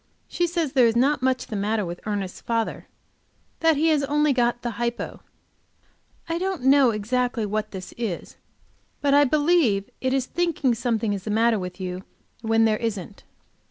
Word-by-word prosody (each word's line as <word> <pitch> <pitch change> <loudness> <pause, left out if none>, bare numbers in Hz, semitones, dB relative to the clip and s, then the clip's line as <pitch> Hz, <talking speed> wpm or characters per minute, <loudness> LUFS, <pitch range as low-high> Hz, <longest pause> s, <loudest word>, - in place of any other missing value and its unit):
She 350 - 0
says 335 -5 -2
there 250 -3 +5
is 225 - 0
not 270 +3 +2
much 260 0 +1
the 215 - -6
matter 210 +1 0
with 175 0 -6
Ernest's 200 -3 -3
father, 230 -1 -2 0.7
that 325 -2 +3
he 320 +3 +3
has 300 -3 +2
only 295 +1 +2
got 240 -1 0
the 240 - -2
hypo. 240 0 -3 1.1
I 330 +1 -2
don't 375 -6 -2
know 270 -1 +6
exactly 230 +2 -1
what 215 +1 -2
this 185 -2 -8
is, 210 -8 -4 0.6
but 280 -1 +2
I 290 0 +6
believe 290 - +2
it 260 - 0
is 265 -1 +1
thinking 330 -6 0
something 230 -2 -1
is 200 - -4
the 215 - -5
matter 225 +1 +2
with 180 0 -6
you 185 0 -5 0.4
when 225 0 +3
there 215 -1 +2
isn't. 205 -4 -5
240 Hz, 175 wpm, -24 LUFS, 215-280 Hz, 1.1 s, know